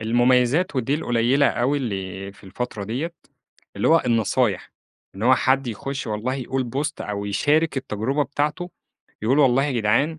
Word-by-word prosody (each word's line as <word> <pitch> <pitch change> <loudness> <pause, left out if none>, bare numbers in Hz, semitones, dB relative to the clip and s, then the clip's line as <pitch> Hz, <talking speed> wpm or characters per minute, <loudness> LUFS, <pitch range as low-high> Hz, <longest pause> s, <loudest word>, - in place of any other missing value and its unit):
المميزات 125 +7 +2
ودي 130 +2 +1
القليلة 130 0 +2
أوي 135 +4 0
اللي 100 -4 -5
في 100 - -19
الفترة 105 +1 -5
ديّة، 135 - -3 0.6
اللي - - +1
هو 165 +1 +5
النصايح. 115 -3 +1 0.4
إن 100 - -7
هو 130 +2 +6
حد 130 0 +1
يخُش 130 +4 -4
والله 110 +5 -2
يقول 130 0 -2
بوست 145 +6 -3
أو 100 -1 -4
يشارك 150 +10 +1
التجربة 130 +3 -1
بتاعته، 150 +5 -2 0.5
يقول 130 +6 +2
والله 135 -1 +4
يا 145 - -1
جدعان 120 +8 +1
125 Hz, 155 wpm, -23 LUFS, 110-140 Hz, 0.6 s, هو